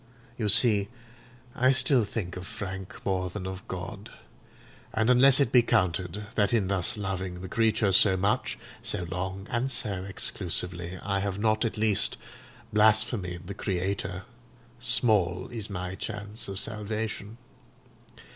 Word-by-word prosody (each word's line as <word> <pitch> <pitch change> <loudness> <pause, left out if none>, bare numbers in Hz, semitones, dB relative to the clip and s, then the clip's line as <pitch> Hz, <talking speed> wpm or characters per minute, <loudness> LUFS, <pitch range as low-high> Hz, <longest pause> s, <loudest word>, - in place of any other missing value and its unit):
You 110 -3 -1
see 105 -3 +6 0.7
I 130 +2 +3
still 130 -3 +4
think 95 -4 -5
of 90 +1 -7
Frank 95 -2 -7
more 95 -2 0
than 95 +1 -6
of 95 0 -7
God; 95 +3 -7 0.9
and 110 +3 +3
unless 130 +2 +7
it 135 -4 +2
be 125 - +7
counted 95 -3 0
that 105 +1 +1
in 100 -5 +1
thus 95 0 +1
loving 95 -3 -4
the 95 - -6
creature 110 0 +1
so 95 0 +5
much, 100 +3 0 0.2
so 90 - -2
long, 95 +2 -4
and 120 +3 0
so 100 -7 0
exclusively, 90 -2 0
I 100 -1 0
have 100 -1 -2
not 110 +2 +1
at 115 - -3
least 105 -2 +2 0.6
blasphemed 105 -4 +2
the 100 - -6
Creator, 95 -1 -3 0.6
small 105 -8 +1
is 110 -3 -4
my 90 -2 -4
chance 105 +2 -6
of 95 -1 -4
salvation. 110 0 -4
100 Hz, 140 wpm, -27 LUFS, 95-110 Hz, 0.9 s, unless